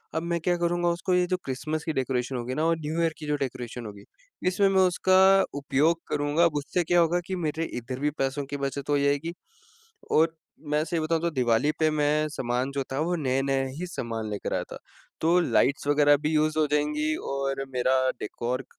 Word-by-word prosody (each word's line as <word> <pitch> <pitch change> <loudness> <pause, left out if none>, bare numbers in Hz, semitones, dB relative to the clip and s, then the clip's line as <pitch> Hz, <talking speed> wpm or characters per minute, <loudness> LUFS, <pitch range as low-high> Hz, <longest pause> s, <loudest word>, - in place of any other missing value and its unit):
अब 160 - -1
मैं 170 0 -1
क्या 175 +1 +1
करूँगा 175 0 +1
उसको 175 +2 -1
ये 180 0 +3
जो 185 0 0
क्रिसमस 155 +4 -3
की 160 - -2
डेकोरेशन 130 -1 -1
होगी 120 +1 -3
ना 155 - 0
और 165 0 +2
न्यू 160 +3 -1
ईयर 165 -1 +1
की 155 - -8
जो 150 - +1
डेकोरेशन 125 -2 -4
होगी 100 -1 -9 0.4
इसमें 195 +2 +3
मैं 190 -1 +4
उसका 185 +1 +3 0.4
उपयोग 145 +4 +2
करूँगा। 145 +4 +1
अब 160 -3 +1
उससे 145 +5 -1
क्या 175 +1 +3
होगा 170 +1 +3
कि 190 - -2
मेरे 160 -2 -2
इधर 125 +2 -5
भी 150 - +1
पैसों 135 +1 -1
की 145 +1 -5
बचत 140 0 -4
हो 145 - +3
जाएगी। 145 +4 0 0.8
और 160 +1 +3 0.4
मैं 150 +1 +2
सही 165 0 -2
बताऊँ 160 +1 0
तो 170 - +1
दिवाली 125 0 +2
पे 155 -1 +3
मैं 150 0 +1
सामान 130 -2 -2
जो 140 - -1
था 135 - -2
वो 170 +3 0
नए-नए 135 -1 0
ही 180 - -3
सामान 115 -9 -4
लेकर 105 - -3
आया - - 0
था। - - -7 0.4
तो 170 +3 +4
लाइट्स 140 -4 +1
वगैरह 145 0 +5
भी 150 +2 -2
यूज़ 155 0 +1
हो 155 - +3
जाएँगी 150 +1 +1 0.2
और 135 0 -2
मेरा 130 +1 +2 0.2
डेकोर 125 +4 -3
150 Hz, 210 wpm, -26 LUFS, 135-165 Hz, 0.8 s, वगैरह